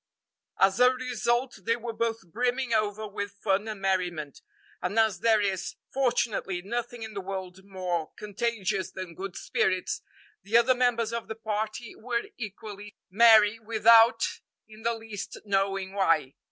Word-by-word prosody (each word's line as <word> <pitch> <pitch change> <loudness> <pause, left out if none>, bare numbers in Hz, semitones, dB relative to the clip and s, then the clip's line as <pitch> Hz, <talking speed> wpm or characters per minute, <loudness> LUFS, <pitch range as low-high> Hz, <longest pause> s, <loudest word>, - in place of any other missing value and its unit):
As 195 +3 +4
a 250 0 +7
result, 245 -1 -1
they 230 - +3
were 235 -1 -6
both 225 -1 -2
brimming 245 +2 0
over 215 0 0
with 205 0 -6
fun 200 +1 +1
and 215 -2 -5
merriment; 180 -6 -1 0.4
and 215 - -2
as 220 -5 +3
there 220 +1 +4
is, 195 -3 -2 0.2
fortunately, 235 -8 0
nothing 240 +2 -4
in 220 -1 -7
the 200 - -4
world 190 -1 -6
more 180 -4 -3
contagious 205 -2 -2
than 185 -3 -7
good 190 +2 -7
spirits, 185 -1 -1 0.4
the 205 +5 +3
other 235 +2 +5
members 240 -2 +1
of 235 -1 -3
the 220 - -5
party 220 +1 -4
were 235 0 -2 0.2
equally 210 -1 -8 0.2
merry 220 0 +6
without 225 +1 +5 0.4
in 215 0 -14
the 230 +1 0
least 225 -3 -7
knowing 195 -1 0
why. 165 -8 +2
215 Hz, 150 wpm, -28 LUFS, 195-230 Hz, 0.4 s, a